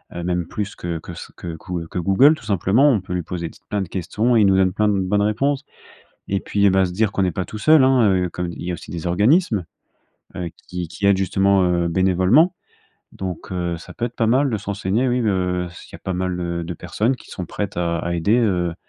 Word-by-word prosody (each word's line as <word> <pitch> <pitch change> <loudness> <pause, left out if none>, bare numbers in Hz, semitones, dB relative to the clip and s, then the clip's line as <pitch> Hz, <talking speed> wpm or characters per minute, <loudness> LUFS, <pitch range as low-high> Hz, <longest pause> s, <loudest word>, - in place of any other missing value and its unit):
Heu, 85 - -4
même 90 -1 -1
plus 105 -2 -4
que 85 -1 -4
que - - -9
ce - - -10
que 85 -2 -6
quou 85 0 -5
que 90 - -4
Google 100 - +5
tout 115 - -14
simplement. 105 +7 +3
On 115 -7 +3
peut 90 - -7
lui 90 - -1
poser 85 0 -4
ts - - -19
plein 105 -1 -1
de - - -7
questions 105 +7 0
et 110 - +5
il 100 - +5
nous 95 - +4
donne 95 -1 +3
plein 105 +1 +1
de 100 -1 +2
bonnes 100 +2 +1
réponses. 135 +7 0 0.6
Et 100 0 0
puis 100 -1 +2
bah, 95 0 +3
se 90 - -6
dire 105 +1 +1
qu'on - - -2
n'est 90 -2 +1
pas 95 +3 -2
tout 110 - -8
seul, 155 +1 +5
hein, 130 -1 +4
heu, 90 -2 0
comme 90 -1 -4
il 85 - -8
y 90 - -3
a - - -1
aussi - - -10
des 85 +1 -5
organismes, 105 - +2 0.7
heu, 90 -2 -3 0.2
qui 90 -2 -4
qui 100 +5 -4
aident 100 -1 +4
justement, 95 0 +2
heu, 85 -1 +1
bénévolement. 95 - +3 0.6
Donc, 95 -1 -6
heu, 85 -2 -2
ça 80 - -12
peut 120 - -2
être 120 - -10
pas 115 - +1
mal 130 +5 +3
de 110 - 0
se 100 - -10
renseigner 100 +5 0
oui, 125 +1 +1
heu, 90 -3 0
s'il 90 - -14
y - - -5
a - - -17
pas 95 - -3
mal 90 0 -2 0.3
de 85 +1 -5
personnes 105 +10 -1
qui - - -16
sont 90 -3 -6
prêtes 100 +1 -4
à 85 -1 0
à 85 0 -2
aider, 100 +7 +2
heu, 90 -7 +1
95 Hz, 255 wpm, -21 LUFS, 90-105 Hz, 0.7 s, Google